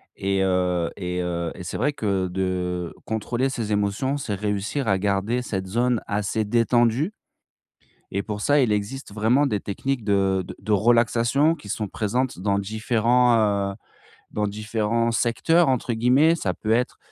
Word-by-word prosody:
et 95 0 0
heu, 90 -2 +1
et 90 -1 -3
heu, 85 -1 -2
et 90 - -8
c'est 90 - -6
vrai 140 +6 +1
que 100 -7 -1
de 90 -1 -2
contrôler 120 +4 -1
ses 115 -5 -3
émotions, 105 +7 0
c'est 115 -7 -3
réussir 105 +6 -2
à 95 - +3
garder 100 +5 0
cette 95 -6 -4
zone, 120 +3 +1
assez 105 +1 -1
détendue, 120 - +2 1.0
et 100 +1 -1
pour 105 -1 -5
ça 145 +6 +3
il 125 -5 +3
existe 105 +3 -3
vraiment 115 +7 +3
des 105 -7 0
techniques 125 +6 -3
de 95 -2 +1
de - - -8
de 110 - -4
relaxation 120 - +3
qui 125 -10 -13
sont 105 +1 -2
présentes 110 +2 -2
dans 100 +1 +1
différents, 115 +4 +2 0.4
heu, - - -13 0.6
«dans 105 0 -1
différents 110 +2 -1
secteurs» 160 +9 +2
entre 130 -2 0
guillemets. 130 +8 +4
Ça 95 - -2
peut 110 - -5
être, 120 +2 0
110 Hz, 160 wpm, -24 LUFS, 100-125 Hz, 1.0 s, guillemets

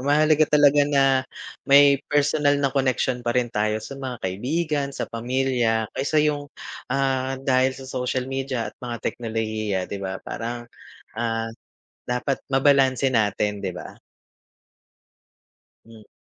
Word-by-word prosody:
mahalaga 150 +2 +3
talaga 145 -1 +5
na 135 -2 +2 0.4
may 140 0 +7
personal 145 0 +2
na 140 -2 0
connection 130 -2 0
pa 120 +1 -1
rin 120 -1 0
tayo 105 0 0
sa 135 0 -8
mga 130 -2 -4
kaibigan, 140 - -1
sa - - -2
pamilya 120 -1 0
kaysa 140 +3 -1
yung, 145 -1 -1 0.4
ah, 135 0 0
dahil 130 -1 +2
sa 135 - -10
social 130 0 -2
media 135 -2 -3
at - - -42
mga 120 -1 -4
teknolohiya, 110 -3 -2
'di 100 - -6
ba, 95 -1 -4
parang, 120 +1 -5 0.6
ah, 115 -1 -2 0.5
dapat 125 +2 -2
mabalanse 135 -1 +3
natin, 105 -2 0
'di 95 - -2
ba. 90 - -8 1.9
Mm. 110 -2 -16
130 Hz, 130 wpm, -23 LUFS, 115-140 Hz, 1.9 s, may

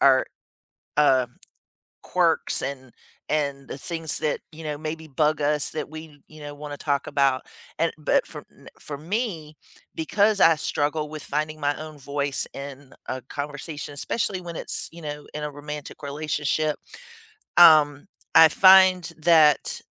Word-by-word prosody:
our, 130 -1 +5 0.7
uh, 130 -4 +4 0.8
quirks - - +1
and 130 -2 -5 0.4
and 140 -3 -2
the - - -6
things 165 0 -3
that, 150 - -1
you 160 +1 -10
know, 150 -1 -4
maybe 160 +1 -6
bug 150 +1 +1
us 150 0 +2
that 155 - -5
we, 155 -2 -11
you 155 0 -14
know, 145 0 -8
wanna 145 0 -8
talk 140 -2 -1
about, 135 -2 +1 0.4
and 165 +1 +1
But 150 - +1
for - - -10
n - - -17
for 145 - -6
me, 165 - -4 0.4
because 200 +5 +1
I 165 - +7
struggle 150 0 -2
with 155 -2 -7
finding 155 +1 -3
my 145 0 0
own 155 -1 -9
voice 140 0 -1
in 140 -1 -9
a 130 - -3
conversation, 145 +2 -6
especially 190 +5 -2
when 170 -2 -8
it's, - - -2
you 170 0 -12
know, 150 -1 -6
in 150 - -4
a 150 - -3
romantic 145 +1 -8
relationship, 150 +1 -1 0.8
um, 150 -4 +7 0.3
I 160 -1 +9
find 185 0 +6
that 155 -2 +4
150 Hz, 150 wpm, -24 LUFS, 145-160 Hz, 0.8 s, I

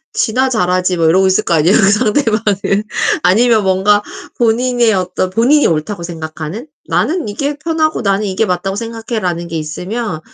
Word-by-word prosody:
"지나 255 +4 +1
잘하지." 185 -5 0
뭐 165 - +2
이러고 190 +3 +3
있을 190 +3 +2
거 170 - 0
아니에요. 165 +6 +3
그 200 -3 +4
상대방은. 210 -3 +1 0.4
아니면 220 +4 +3
뭔가 195 +2 +2 0.4
본인의 240 0 +2
어떤 185 0 -2
본인이 255 +9 +3
옳다고 170 +4 -2
생각하는 160 - -7 0.2
'나는 330 -4 -1
이게 280 +8 -3
편하고 315 -1 -1
나는 200 +1 0
이게 195 +3 0
맞다고 195 +1 -2
생각해.'라는 220 -6 -4
게 165 - -5
있으면 180 +5 -4
205 Hz, 370 characters per minute, -15 LUFS, 180-230 Hz, 0.4 s, 그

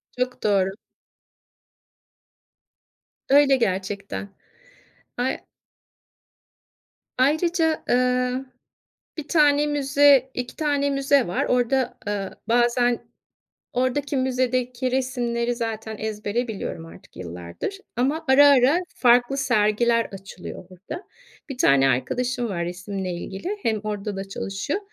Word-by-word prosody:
Çok 250 0 -3
doğru. 195 -2 +2 2.6
Öyle 280 0 +6
gerçekten. 200 -2 -2 0.9
Ay 250 +2 -1 1.8
Ayrıca, 320 +4 +2
ııı, 250 +1 +1 0.7
1 305 -2 -6
tane 295 -2 +4
müze, 280 -2 +4
2 250 0 -5
tane 285 -2 0
müze 275 -1 +2
var. 175 - -1
Orada, 250 0 +1
ııı, 200 -2 -2 0.2
bazen 240 +1 +2 0.7
oradaki, 260 +3 0
müzedeki 255 -1 0
resimleri 245 -2 -1
zaten 220 -2 -4
ezbere 215 +3 -3
biliyorum 195 -6 -5
artık 165 - -15
yıllardır 85 - -6 0.2
ama 285 +7 0
ara 275 +2 +7
ara 280 +3 +5 0.2
farklı 245 +2 +4
sergiler 230 -2 +2
açılıyor 190 -2 -10
burada. 200 - -9 0.5
Bir 270 - -6
tane 135 - +4
arkadaşım 245 - -1
var, 170 -3 -2
resimle 185 +1 -5
ilgili 195 - -5
hem 220 -2 +1
orada 210 -1 -4
da 195 0 -5
çalışıyor. 195 - -3
245 Hz, 100 wpm, -23 LUFS, 205-270 Hz, 2.6 s, ara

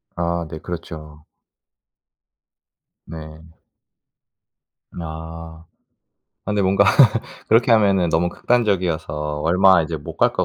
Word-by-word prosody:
아 85 0 -2
네. 80 - -7
그렇죠. 80 -3 -9 1.8
네. 80 +1 -11 1.4
아. 80 0 -9 0.8
근데 105 -1 -1
뭔가 100 +1 +3 0.6
그렇게 115 +2 +4
하면은 100 -5 +3
너무 85 +2 +1
극단적이어서 85 -11 -1
얼마 90 +2 +4
이제 80 +1 -4
못 70 - -10
갈 - - +2
것 - - -1
85 Hz, 185 characters per minute, -20 LUFS, 80-95 Hz, 1.8 s, 그렇게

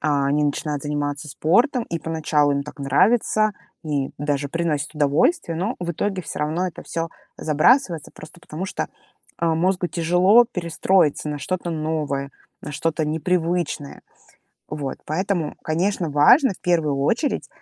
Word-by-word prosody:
А, 140 -2 +1
они 150 +1 +2
начинают 145 0 -2
заниматься 145 0 -3
спортом, 235 - +2
и 170 - -4
поначалу 155 -3 +1
им 140 0 0
так 150 - -11
нравится 215 - +3 0.3
и 145 -3 -1
даже 145 -1 -1
приносит 155 -2 -2
удовольствие, 155 - +2
но 200 +8 -1
в 170 -1 -2
итоге 190 +2 -2
всё - - -6
равно 160 +5 0
это - - -10
всё 165 0 -3 0.3
забрасывается 165 - +2
просто 165 +3 -13
потому, 165 +4 -6
что, - - -3 0.5
а, 165 -1 +1
мозгу 180 +2 +1
тяжело 180 +7 +4
перестроиться 170 - +1
на 150 -1 -3
что-то 175 +5 -3
новое, 155 -3 -2 0.3
на 145 - -6
что-то 160 +1 -1
непривычное. 165 -2 -1 0.7
Вот. 145 -3 -4
Поэтому, 175 0 -1
конечно, 170 +1 0
важно 190 - +6
в - - -19
первую 160 -5 +1
очередь, 230 - 0
160 Hz, 145 wpm, -22 LUFS, 150-180 Hz, 0.7 s, важно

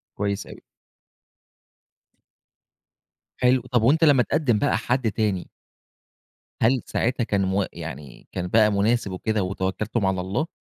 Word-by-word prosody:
كويس 100 -1 -2
أوي. - - -12 2.8
حلو، 125 0 +3
طب 120 - +3
وأنت 155 +8 +4
لما 145 -4 +5
اتقدم 135 -7 +1
بقى - - +1
حد 120 -2 0
تاني 105 -5 -1 1.1
هل 120 +2 +3
ساعتها 120 0 0
كان 100 -3 0
م 95 +1 +1
يعني 75 -5 -9
كان 90 -1 -3
بقى 110 +1 +4
مناسب 100 0 +1
وكده 105 +2 -1
وتوكلتم 95 +3 -2
على 95 -1 0
الله، 95 - -2
105 Hz, 125 wpm, -24 LUFS, 95-120 Hz, 2.8 s, لما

